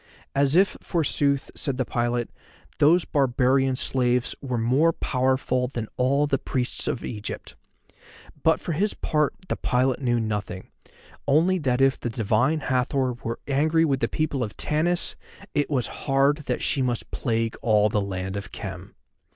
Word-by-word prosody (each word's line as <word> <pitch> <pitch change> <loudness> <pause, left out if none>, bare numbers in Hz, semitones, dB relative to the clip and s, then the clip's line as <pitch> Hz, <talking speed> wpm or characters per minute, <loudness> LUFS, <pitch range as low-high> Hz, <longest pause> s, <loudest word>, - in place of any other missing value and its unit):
As 140 +1 +2
if, 190 +2 +4
forsooth, 140 -4 0
said 135 -4 -3
the 130 - 0
pilot, 120 0 -1 0.5
those 165 +4 +5
barbarian 135 -1 +2
slaves 125 -1 0
were 125 -3 -2
more 130 +9 +3
powerful 130 -1 0
than 120 -4 -5
all 140 +3 +2
the 140 -2 0
priests 125 -2 -1
of - - -2
Egypt. 105 -3 -6 0.9
But 160 +2 +3
for - - -4
his 200 +7 0
part, 150 -2 0
the - - -1
pilot 130 +2 +1
knew 120 -2 +1
nothing, 105 -4 -4 0.6
only 165 +6 +3
that 130 -4 0
if 135 0 +3
the 120 - -3
Divine 115 +7 +1
Hathor 130 0 0
were 115 -1 -5
angry 155 +4 +3
with 135 -4 +1
the - - +1
people 145 -4 -1
of 105 - -6
Tanis 170 +4 0 0.4
it 145 -1 0
was 130 -6 0 0.2
hard 135 +2 +4
that - - -1
she 140 - +1
must 125 -2 -2
plague 115 -2 -1
all 105 -2 +4
the 105 -1 0
land 95 -1 -4
of 100 0 -6
Khem. - - -8
130 Hz, 160 wpm, -25 LUFS, 120-145 Hz, 0.9 s, those